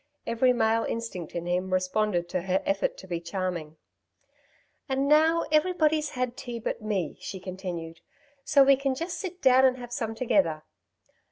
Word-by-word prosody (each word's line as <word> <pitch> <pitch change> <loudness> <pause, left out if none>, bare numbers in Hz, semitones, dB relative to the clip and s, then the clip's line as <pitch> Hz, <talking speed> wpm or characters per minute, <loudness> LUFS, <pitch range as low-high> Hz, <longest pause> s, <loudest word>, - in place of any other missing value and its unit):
Every 230 +2 +3
male 225 -2 +2
instinct 230 -8 -5
in 170 0 -3
him 180 +1 -1
responded 185 -1 0
to 180 - -1
her 190 +1 0
effort 195 0 0
to 190 - -11
be 175 -2 -2
charming. 170 -3 -4 1.1
"And 270 +1 0
now 320 +3 +4
everybody's 310 -2 +2
had 250 -1 -1
tea 240 -2 -6
but 230 - -4
me," 200 -7 -2
she 190 - -6
continued. 180 -3 -6 0.4
"So 275 0 +5
we 275 0 +5
can 270 -1 -1
just 340 +4 -4
sit 365 -2 -7
down 260 0 +6
and 260 -1 +4
have 245 -1 -8
some 225 -4 -3
together." 185 -10 +1
225 Hz, 165 wpm, -27 LUFS, 185-270 Hz, 1.1 s, down